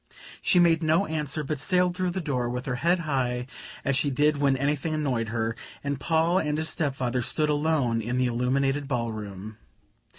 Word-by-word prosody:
She - - +3
made 170 -2 +5
no 160 +5 +3
answer, 155 -2 -2
but 150 0 -3
sailed 180 +3 +2
through 185 0 0
the 185 +2 -3
door 130 -6 -1
with 125 +1 -4
her 125 -2 -2
head 170 +6 +2
high, 125 -5 -1 0.4
as 140 - +2
she 145 +2 +1
did 150 +2 +2
when 140 -2 +2
anything 145 +3 -1
annoyed 130 -7 -1
her; 115 0 -1 0.3
and 140 -1 -2
Paul 165 +4 +2
and 150 -3 -1
his 160 +1 -1
step 145 -4 -1
father 125 -1 -1
stood 150 +5 0
alone 145 -6 +1
in 120 +3 -2
the 130 - +2
illuminated 135 +4 0
ball 120 -4 -1
room. 105 0 -8
140 Hz, 195 wpm, -26 LUFS, 125-155 Hz, 0.4 s, made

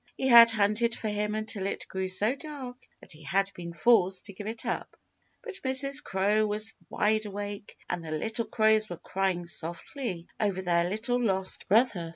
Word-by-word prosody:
He 265 - 0
had 235 -1 +10
hunted 225 +1 +1
for 220 - -3
him 210 0 -1
until 215 -3 -3
it - - -5
grew 190 0 -3
so 210 +6 +1
dark 280 -4 -8 0.3
that - - -15
he 155 - -11
had 195 +5 0
been 170 -1 -7
forced 185 +1 +3
to 200 - -7
give 205 +2 -8
it 225 +1 -5
up. - - -4 0.5
But 445 -5 -7
Mrs. 275 +2 +2
Crow 205 +3 +1
was 210 +1 -1 0.2
wide 215 0 +1
awake 205 0 -7
and 175 -1 -3
the 160 - -7
little 220 +9 -2
crows 215 0 +3
were 175 - -5
crying 185 -1 -2
softly 175 - -5
over 195 -3 0
their 170 -1 +2
little 245 +5 -1
lost 190 -3 -1
brother. 200 -6 +2
210 Hz, 185 wpm, -28 LUFS, 190-230 Hz, 0.5 s, had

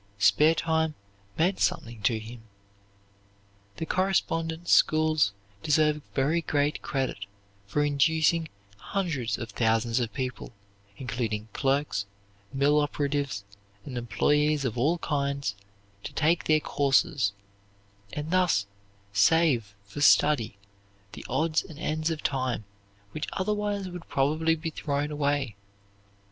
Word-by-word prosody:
Spare 150 +10 +5
time 160 -1 0 0.4
meant 180 +4 +2
something 115 -2 -1
to 110 +3 +2
him. 110 +2 -9 1.4
The - - -3
correspondence 165 -2 0
schools 155 -7 +4 0.3
deserve 150 +1 +2
very 150 +5 +2
great 145 -1 0
credit 130 -8 -3 0.4
for 145 +9 +1
inducing 160 +3 +2 0.3
hundreds 135 - -2
of 115 -2 -6
thousands 115 +2 +1
of 115 -3 -2
people, 130 -1 -5 0.4
including 115 -4 -3
clerks, 135 -7 0 0.4
mill 145 +2 +3
operatives, 145 -6 -1 0.4
and 130 - -7
employees 145 +6 +1
of 115 - -1
all 145 +8 +2
kinds, 140 -6 -1 0.5
to - - -7
take 165 +2 +2
their 155 -1 +3
courses, 135 -6 +2 0.8
and 150 +2 -5
thus 180 - +3 0.5
save 115 -2 +3
for 100 +8 -7
study 135 -8 +4 0.5
the - - -9
odds 155 +5 +1
and 155 - -12
ends 155 +1 -1
of 160 -2 -4
time 130 -5 -1 0.5
which 155 - -4
otherwise 205 0 -1
would 180 -1 -9
probably 155 +4 +2
be 160 0 -4
thrown 145 0 -2
away. 145 -5 0
145 Hz, 115 wpm, -27 LUFS, 125-160 Hz, 1.4 s, Spare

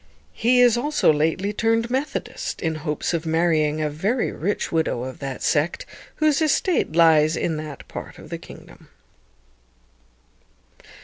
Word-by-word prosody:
He 245 +2 +3
is 240 -1 +5
also 290 - +2
lately 165 +7 0
turned 225 +2 +1
Methodist, 275 +2 -3
in 160 -2 -1
hopes 155 +1 -3
of 165 -1 -2
marrying 160 -2 +1
a - - +1
very 195 - -1
rich 200 +7 -2
widow 160 -7 0
of 130 0 -7
that 135 -2 -5
sect, 155 +3 0 0.3
whose 310 -1 +2
estate 315 - +1
lies 160 -1 +5
in 160 -2 -1
that 155 -2 -8
part - - -8
of - - -13
the - - -4
kingdom. - - -14
165 Hz, 140 wpm, -23 LUFS, 155-235 Hz, 0.3 s, is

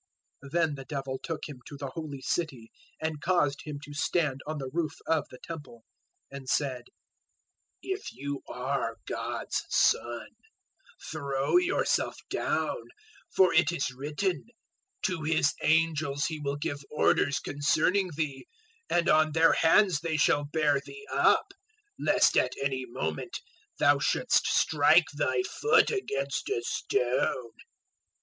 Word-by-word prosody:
'" - - -33
004:005 135 - -11
Then 165 -3 +2
the 135 -2 -8
Devil 135 -2 -4
took 165 -2 -4
Him 145 -4 -9
to 145 - -9
the 140 -1 -5
Holy 150 -4 -6
City 130 -8 -3 0.3
and 155 -2 -3
caused 160 -6 +1
Him 150 -2 -5
to 145 - -9
stand 145 -2 0
on 155 0 -3
the 135 -2 -5
roof 165 -3 -1
of 160 -2 +1
the 125 - -11
Temple, 145 -7 -9 0.5
004:006 140 - -6
and 130 -1 -10
said, 130 -4 0 1.0
"If 385 +1 -4
you 140 +1 -5
are 125 -2 -2
God's - - -3
Son, 120 -1 +1 0.8
throw 140 - +1
yourself 360 +1 +1
down; - - -1 0.5
for 185 -2 +4
it 165 0 +4
is 135 -6 -1
written, 150 - -2 0.6
"`To 160 -4 -1
His 155 -3 +3
angels 155 -3 +2
He 155 -2 -3
will 140 -1 -2
give 145 0 -3
orders 140 -2 +2
concerning 160 +6 +1
thee, 155 - -3 0.4
and 175 -1 +2
on 155 0 +4
their 165 +1 +5
hands 180 0 +4
they 165 -1 -1
shall 145 -1 +3
bear 145 -1 +2
thee 420 0 -11
up, 395 - +3 0.5
lest - - +3
at - - +3
any 135 -2 -2
moment 80 -9 -4 0.4
thou 145 0 +4
shouldst - - +2
strike - - +4
thy 385 - 0
foot 445 +3 +3
against 140 - -2
a 120 - -1
stone.'" 125 -1 0
145 Hz, 140 wpm, -29 LUFS, 135-165 Hz, 1.0 s, their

